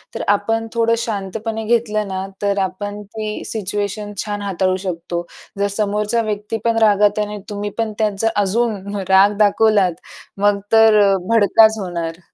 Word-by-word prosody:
तर - - -3
आपण 225 +3 +1
थोडं 230 0 +2
शांतपणे 220 0 -4
घेतलं 215 -2 0
ना, 190 0 -4 0.2
तर 200 -1 0
आपण 205 +2 -5
ती 215 +1 -6
सिच्युएशन 205 0 -3
छान 205 -1 -4
हाताळू 190 -2 0
शकतो. 170 0 -4 0.3
जर 200 - +2
समोरचा 210 +2 0
व्यक्तीपण 220 +1 -2
रागात 210 -1 +4
आणि 210 0 -7
तुम्ही 205 0 -4
पण 225 -2 -1
त्याचा 210 0 0
अजून 205 -1 -1
राग 200 +2 +5
दाखवलात 205 -3 +3 0.5
मग 205 0 +3
तर 220 -1 +6 0.3
भडकाच 220 0 +5
होणार. 170 -3 -4
210 Hz, 135 wpm, -19 LUFS, 200-220 Hz, 0.5 s, तर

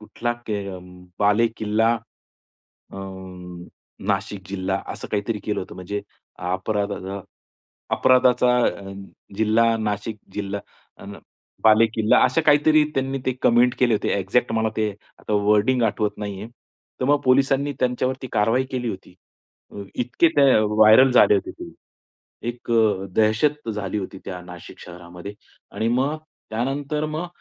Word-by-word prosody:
कुठला 120 +2 -3
के 105 -2 -3
अ, 95 - -6 0.4
बालेकिल्ला 110 +1 +2 1.0
अ, - - -9 1.1
नाशिक 95 0 -2
जिल्हा. 95 0 -2 0.2
असं - - -8
काहीतरी 105 +1 -1
केलं 105 - -2
होतं 95 - -8
म्हणजे 100 +3 -5 0.5
अपराध, 100 +2 -1
अ, 95 0 -5 0.8
अपराधाचा 125 -1 +4
अ, 100 0 -4 0.4
जिल्हा 115 +1 +3
नाशिक 105 0 -3 0.2
जिल्हा 100 -1 -4 0.4
अ, - - -11 0.6
बालेकिल्ला 110 0 +4
असं 130 - +2
काहीतरी 150 +1 +5
त्यांनी 135 0 -1
ते 130 - +2
कमेंट 120 +1 +4
केले 120 -3 +3
होते. - - -1
एक्झॅक्ट 115 +6 0
मला 110 0 +1
ते 110 -1 0 0.3
आता - - -6 0.2
वर्डिंग 115 +4 +3
आठवत 105 -2 0
नाहीये. 100 0 -5 0.5
तर - - 0
मग 145 0 +3
पोलिसांनी 135 +2 +3
त्यांच्यावरती 130 +1 -1
कारवाई 115 +5 +2
केली 125 -2 -2
होती. 95 -3 -8 0.6
अ, 100 - -7
इतके 125 +7 +2
ते 140 -1 +6
व्हायरल 110 +4 +6
झाले 105 - +6
होते 100 - -2
ते. - - -10 0.8
एक 120 0 -7
अ, 110 -4 +2
दहशत 115 +5 +1
झाली 105 -1 -3
होती 95 0 -5
त्या 90 -2 -6
नाशिक 90 -1 -12
शहरामध्ये 90 +3 -10 0.4
आणि 110 - -2
मग 135 +6 +1 0.3
त्यानंतर 140 +6 -2
मग 155 +3 -4
110 Hz, 135 wpm, -23 LUFS, 100-125 Hz, 1.1 s, ते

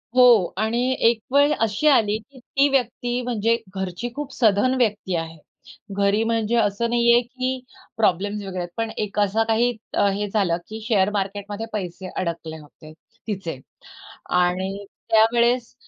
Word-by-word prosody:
हो 255 - +6 0.4
आणि 220 +3 0 0.3
एक 230 -1 -1
वेळ 285 +1 +5
अशी 225 +6 +1
आली 215 -7 +4
की 260 +5 -17 0.2
ती 280 +1 +6
व्यक्ती 245 -2 -1
म्हणजे 230 -2 +1 0.2
घरची 190 +5 -4
खूप 285 -2 -5
सधन 225 +1 +3
व्यक्ती 210 -6 0
आहे. 165 0 -4 0.6
घरी 200 +2 +2
म्हणजे 225 0 0
असं 220 +1 +1
नाही 235 0 +3
आहे 240 - +5
की 255 +1 -3 0.4
प्रॉब्लेम्स 205 0 +1
वगैरे 185 -1 -5
आहेत, 175 0 -4
पण 225 -1 -1
एक 210 -1 -2
असा 205 +2 +2
काही 230 +2 +2 0.2
अ, 205 - +3
हे 205 +1 -2
झालं 195 -5 +1
की 220 +1 -6
शेअर 200 -4 +3
मार्केटमध्ये 205 +2 -3
पैसे 185 -2 -5
अडकले 170 -3 -4
होते 155 +1 -15 0.4
तिचे 190 -9 -4 0.8
आणि 190 +3 -1 0.2
त्यावेळेस 235 +2 +3
215 Hz, 150 wpm, -23 LUFS, 195-235 Hz, 0.8 s, हो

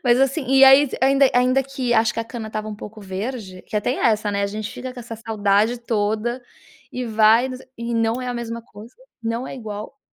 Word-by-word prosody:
Mas 245 +1 +4
assim 270 +2 +1
e 270 +1 +4
aí 270 +2 +7
ainda 270 +1 +5
ainda 255 +2 +3
que 265 -2 -2
acho 225 0 +3
que 230 - -1
a - - -4
cana 230 -1 -7
estava 215 0 -5
um 215 - -5
pouco 215 +1 -10
verde, 195 0 -6
que - - -11
até 210 +4 0
é - - +1
essa, 210 -1 -1
né, 200 0 -1
a - - +1
gente 210 +1 -5
fica 255 0 -7
com 250 - -8
essa 230 -1 -8
saudade 220 +1 +1
toda 225 +2 -1 0.5
e 250 - -3
vai 225 +2 +4 0.3
e 235 0 -4
não 230 +2 0
é 250 - -4
a 245 - -3
mesma 235 -1 -5
coisa, 220 +1 -14 0.3
não 230 +3 -2
é - - -7
igual. 215 +3 -7
230 Hz, 225 wpm, -22 LUFS, 215-250 Hz, 0.5 s, aí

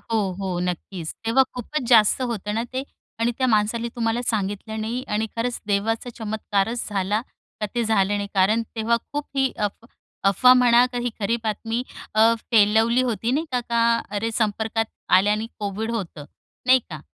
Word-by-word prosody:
हो, 225 -1 -1 0.2
हो, 185 -2 -2
नक्कीच. 180 -1 -4
तेव्हा 245 +4 +4
खूपच 260 +4 -3
जास्त 225 0 +5
होतं 215 -4 -3
ना 225 - 0
ते 260 +1 -2 0.4
आणि 235 +1 +2
त्या 260 - +2
माणसाने 225 +1 +1
तुम्हाला 230 0 0
सांगितलं 215 +1 -2
नाही 235 +4 -3
आणि 215 +1 0
खरंच 235 +1 -2
देवाचा 220 +4 0
चमत्कारच 220 +1 -2
झाला 205 +1 0 0.4
का 210 - 0
ते 235 -1 +1
झालं 205 -2 +2
नाही. 205 0 -3
कारण 210 +4 +3
तेव्हा 225 +1 +2 0.2
खूप 290 0 -3
ही 265 -1 +2
अफ 210 +2 -3 0.5
अफवा 250 +6 +6
म्हणा 245 -1 +6
का 245 - -2
ही 245 - 0
खरी 215 +4 +1
बातमी 225 +2 -2 0.3
अ, 225 +1 +5 0.2
फैलवली 225 +2 +4
होती 235 -2 -1
नाही 300 +6 0
का, 250 - +1
का 235 0 +2
अरे, 210 +2 -2
संपर्कात 220 0 0 0.3
आल्याने 210 +3 +1
कोविड 210 +2 -3
होतं. 185 -10 -5 0.4
नाही 260 +1 +7
का? 155 -1 -7
225 Hz, 170 wpm, -23 LUFS, 205-235 Hz, 0.5 s, नाही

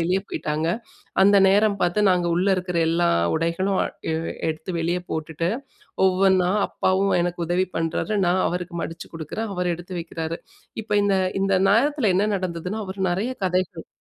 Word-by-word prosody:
வெளியே 180 +3 +1
போயிட்டாங்க. 155 +2 -2 0.5
அந்த 200 +1 +6
நேரம் 200 +1 +3
பார்த்து 175 +4 +1
நாங்க 180 -1 +2
உள்ளே 190 +3 +2
இருக்கிற 180 -1 -2
எல்லா 170 +1 +2 0.3
உடைகளும் 170 +4 0 0.3
எ - - 0 0.3
எடுத்து 160 +3 -4
வெளியே 175 +2 0
போட்டுட்டு 160 +1 -2 0.6
ஒவ்வொன்னா 190 -1 +3 0.2
அப்பாவும் 190 +1 +1
எனக்கு 175 0 -2
உதவி 180 +2 +1
பண்ணுறாரு, 165 +6 -1
நான் 185 +1 +2
அவருக்கு 180 0 -4
மடிச்சு 165 0 -7
கொடுக்குறேன். 165 +8 -4
அவர் 180 0 0
எடுத்து 175 +2 -10
வைக்கிறாரு. 165 0 -4 0.5
இப்போ 210 -1 -1
இந்த 200 -1 +2 0.3
இந்த 195 0 +1 0.2
நேரத்தில 240 +1 +3
என்ன 205 +3 +2
நடந்ததுனா? 185 +3 -4
அவர் 190 +1 -7
நிறைய 205 +8 -1
கதைகள் 180 -2 -1
180 Hz, 150 wpm, -23 LUFS, 170-195 Hz, 0.6 s, அந்த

